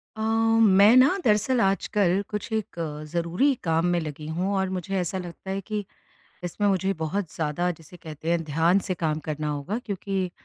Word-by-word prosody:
अ, 220 - -6
मैं 225 -1 +5
ना 270 +9 +5
दरअसल 220 +3 +3
आजकल 195 -1 +2
कुछ 210 +2 -5
एक 220 -5 -3
अ, 150 -2 -4
ज़रूरी 175 - +1
काम 165 0 +1
में 175 0 +2
लगी 150 -1 -6
हूँ 180 +5 -1
और 190 -1 0
मुझे 185 +1 -3
ऐसा 180 +1 -2
लगता 180 +1 -8
है 195 - -2
कि 210 +1 -4 0.6
इसमें 190 +4 -1
मुझे 190 0 +1
बहुत 160 +2 -3
ज़्यादा 160 +3 -1
जिसे 160 +2 -14
कहते 160 -1 -6
हैं 170 -1 +1
ध्यान 165 +5 +3
से 185 - 0
काम 160 -3 -1
करना 155 0 -2
होगा 145 +9 -3
क्योंकि 195 -2 -2
185 Hz, 185 wpm, -25 LUFS, 165-205 Hz, 0.6 s, मैं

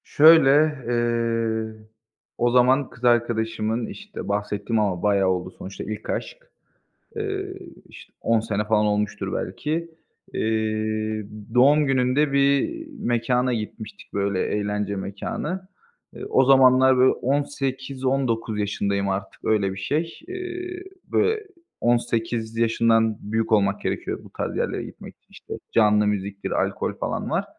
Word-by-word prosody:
Şöyle, 155 -2 +7 0.4
eee, 115 -2 0 0.6
o 120 0 +2
zaman 130 +2 +4
kız 120 - -17
arkadaşımın, 115 -1 +1
işte, 210 0 -8
bahsettiğim 105 +2 -1
ama 95 -5 0
bayağı 100 -2 +3
oldu, 90 0 -1
sonuçta 95 +1 -8
ilk 105 0 -6
aşk. - - -3 0.8
Eee, 390 -3 -3 0.3
işte, - - -14
10 115 -1 +2
sene 105 -1 -2
falan 105 0 +2
olmuştur 105 0 -1
belki, 165 +3 -3 0.4
eee, 110 -1 -1 0.3
doğum 145 +4 +5
gününde 135 +2 +2
bir 140 - +3 0.3
mekâna 125 - +1
gitmiştik, 110 -1 -7
böyle, 100 -1 0
eğlence 105 -1 -2
mekânı. 150 - -4 0.5
Eee, - - -7
o 130 - +4
zamanlar, 130 0 +6
böyle, 130 +1 +5
18-19 135 -4 -1
yaşındayım 100 -1 -1
artık, 95 0 -4
öyle 105 -3 +1
bir 95 - -8
şey. 155 - -2
Eee, 360 -1 -6 0.2
böyle, 435 -1 0 0.3
18 115 -1 0
yaşından 115 -1 +2
büyük 110 +2 -2
olmak 100 -1 +3
gerekiyor - - -3
bu - - -14
tarz - - -4
yerlere - - -1
gitmek - - -11
için. - - -48
İşte, - - -9 0.2
canlı 105 -1 +4
müziktir, 100 -1 -2
alkol - - -1
falan - - -3
var. - - 0
115 Hz, 125 wpm, -24 LUFS, 105-135 Hz, 0.8 s, Şöyle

